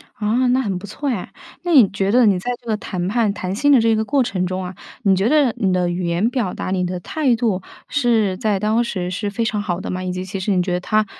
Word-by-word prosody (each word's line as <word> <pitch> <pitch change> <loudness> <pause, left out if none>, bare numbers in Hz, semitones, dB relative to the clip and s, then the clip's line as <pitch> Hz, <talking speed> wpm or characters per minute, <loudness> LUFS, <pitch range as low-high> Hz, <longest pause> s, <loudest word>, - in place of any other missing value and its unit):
啊， 230 +4 +1
那 255 +2 +3
很 200 -7 -2
不 195 +3 -8
错 280 +8 -4
诶。 225 -8 -3 0.3
那 350 - -1
你 255 -9 +8
觉 195 0 -1
得 245 +1 +5
你 195 -4 +3
在 245 +7 -3
这 235 - -18
个 220 - +1
谈 180 -3 -4
判、 215 0 +1
谈 185 -2 -4
薪 290 +7 +3
的 270 - +7
这 225 0 +3
个 220 - 0
过 275 +2 +2
程 190 -6 -1
中 185 +1 -3
啊， 180 +1 -7 0.3
你 195 -3 +4
觉 195 +5 +1
得 290 -6 +3
你 200 -5 +1
的 180 -1 +1
语 175 +1 -2
言 175 +7 +1
表 245 -8 -2
达、 - - -4
你 185 -1 0
的 180 0 -3
态 270 - 0
度， 220 -5 0 0.3
是 225 -8 +1
在 210 -3 0
当 220 +4 +2
时 185 -6 -3
是 205 +2 -2
非 210 +3 -2
常 210 -2 -1
好 180 -4 -2
的 - - -6
吗？ 185 0 -3
以 185 - -2
及 185 +1 -4
其 190 +1 -5
实 190 +2 -1
你 180 - +3
觉 180 0 -2
得 180 - 0
它， 215 +3 +1
205 Hz, 300 characters per minute, -20 LUFS, 185-235 Hz, 0.3 s, 你